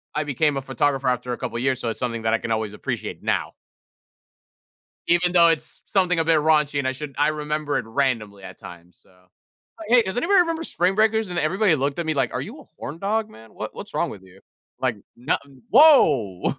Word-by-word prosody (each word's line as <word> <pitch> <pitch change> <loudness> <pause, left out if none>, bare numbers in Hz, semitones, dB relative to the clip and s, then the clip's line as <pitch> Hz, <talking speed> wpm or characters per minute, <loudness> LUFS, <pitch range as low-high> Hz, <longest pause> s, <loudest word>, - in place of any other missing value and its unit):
I 150 - 0
became 145 0 0
a - - -2
photographer 135 0 -1
after 125 0 -2
a - - -5
couple 115 - -4
years, 130 0 0
so 115 - -2
it's 115 - -5
something 115 -3 -3
that 110 0 +1
I 115 - +2
can 120 - -5
always 110 -2 -1
appreciate - - -5
now. - - -1 1.6
Even 175 +1 +3
though 170 -2 +6
it's 165 -2 -2
something 180 -3 +1
a 165 - +1
bit 165 -1 +4
raunchy 150 -2 +2
and 130 - -1
I - - +1
should 140 +1 -8
I 145 +1 +3
remember 150 -1 -2
it - - -3
randomly 110 -6 -2
at - - -10
times, 90 -3 -13
so 95 - -25 0.7
“Hey, 240 +1 +6
does 190 0 -5
anybody 365 +9 +4
remember 330 -2 0
Spring 185 - 0
Breakers?” 220 0 +2
And 175 -1 -4
everybody 180 +3 +2
looked 140 +3 -2
at 170 - -2
me 155 - 0
like, 135 - 0
"Are - - -2
you - - -8
a - - -15 0.2
horndog, 205 +8 -2
man? 110 - -16
What - - -6
what's - - -9
wrong - - 0
with 100 -3 -10
you? 95 +1 -18 0.4
Like, 125 -4 0 0.2
no 125 +6 0 0.4
woah!" 135 - +5
145 Hz, 215 wpm, -23 LUFS, 120-175 Hz, 1.6 s, though